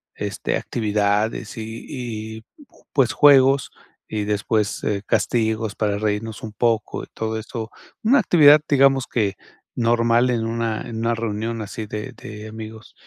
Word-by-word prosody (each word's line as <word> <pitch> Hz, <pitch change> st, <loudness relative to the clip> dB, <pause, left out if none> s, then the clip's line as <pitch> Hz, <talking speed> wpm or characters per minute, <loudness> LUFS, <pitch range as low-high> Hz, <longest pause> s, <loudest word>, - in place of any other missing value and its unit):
este, -, -, -3 dB
actividades 105 Hz, 0 st, -1 dB
y 110 Hz, +1 st, -7 dB, 0.5 s
y -, -, -10 dB, 0.3 s
j -, -, -25 dB
pues 135 Hz, -5 st, +3 dB
juegos 135 Hz, -1 st, +5 dB, 0.4 s
y 105 Hz, -1 st, -3 dB
después, 105 Hz, +1 st, -1 dB, 0.2 s
castigos 110 Hz, -2 st, 0 dB
para 105 Hz, -2 st, 0 dB
reírnos 105 Hz, +1 st, -3 dB
un 110 Hz, -, -5 dB
poco 115 Hz, +1 st, 0 dB
y -, -, -10 dB
todo 110 Hz, 0 st, -3 dB
eso. 110 Hz, 0 st, -6 dB, 0.3 s
Una 260 Hz, +6 st, +5 dB
actividad, 150 Hz, -3 st, +7 dB
digamos 135 Hz, -2 st, +4 dB
que, 100 Hz, -4 st, 0 dB, 0.4 s
normal 115 Hz, +1 st, +2 dB
en 115 Hz, -2 st, -1 dB
una 115 Hz, -1 st, -2 dB
en 115 Hz, -, -7 dB
una 115 Hz, +1 st, 0 dB
reunión 115 Hz, 0 st, -3 dB
así 110 Hz, +1 st, -6 dB
de 105 Hz, 0 st, -5 dB
de 105 Hz, 0 st, -10 dB
amigos. 110 Hz, 0 st, -10 dB
110 Hz, 140 wpm, -22 LUFS, 110-120 Hz, 0.5 s, actividad